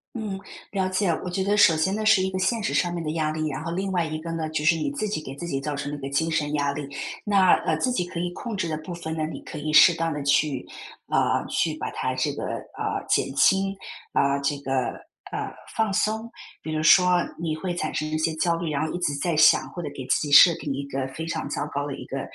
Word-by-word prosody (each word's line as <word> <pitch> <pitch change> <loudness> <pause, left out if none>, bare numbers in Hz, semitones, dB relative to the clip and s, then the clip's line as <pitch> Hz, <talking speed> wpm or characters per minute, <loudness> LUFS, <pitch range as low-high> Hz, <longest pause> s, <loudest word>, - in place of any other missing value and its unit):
嗯， 210 -4 -4 0.3
了 190 -2 0
解， 185 +1 +1 0.2
我 180 - -3
觉 190 +2 -1
得 205 +2 +1
首 170 -5 +6
先 175 +5 +1
呢 215 +1 -2
是 215 -2 +5
一 190 - 0
个 190 - -3
现 210 +4 0
实 - - -1
上 175 -1 +1
面 170 - -3
的 155 -1 -2
压 155 -2 0
力 155 0 -2
啊， 135 - -4
然 - - -6
后 165 - -3
另 190 +2 -2
外 175 -2 +1
一 155 -1 -4
个 165 +1 -6
呢， 165 -1 -2
就 155 -1 -2
是 165 +2 +4
你 160 - -2
自 250 -7 -2
己 200 -7 -3
给 135 - -7
自 170 - -6
己 135 -5 -2
造 145 +2 -3
成 145 +1 -4
了 145 - -4
一 - - -11
个 135 - -4
精 160 +4 0
神 150 -2 0
压 145 -1 +1
力。 145 0 -4 0.4
那， 195 -3 +4
呃， 160 - +2
自 255 - +1
己 210 -8 0
可 175 -1 -6
以 175 - -1
控 235 -3 -5
制 185 -4 -2
的 155 - -2
部 155 +3 -8
分 165 -2 -5
呢， 155 - -1
你 160 - -7
可 - - -9
以 155 +1 -3
适 170 +3 +8
当 165 0 -1
地 150 -1 -4
去， 140 -1 +1 0.4
啊， - - +1
去 - - 0
把 - - -4
它 - - -2
这 - - 0
个， - - -5
呃， - - -4
减 135 - +1
轻， 195 +7 +3 0.4
啊， 140 0 +2
这 140 0 -1
个， 135 -1 -5 0.6
呃， - - -3 0.2
放 220 -2 +1
松。 220 +3 0 0.3
比 155 - -5
如 155 0 -1
说 180 +3 +6 0.2
你 160 -2 -2
会 175 +2 -3
产 155 -3 -3
生 155 - -1
一 155 - -1
些 160 0 0
焦 170 +2 +1
虑， 165 -1 -3
然 150 +1 0
后 155 - -5
一 - - -3
直 145 -5 0
在 170 +2 0
想， 155 0 +5
或 175 - -6
者 150 - -3
给 130 - -6
自 - - +3
己 150 - -3
设 170 +4 +9
定 145 - -4
一 140 +1 -4
个 135 -1 -3
非 160 +5 -6
常 165 - -3
糟 145 0 -2
糕 145 0 -2
的 140 - -4
一 - - -8
个 135 0 -4
160 Hz, 300 characters per minute, -25 LUFS, 150-185 Hz, 0.6 s, 设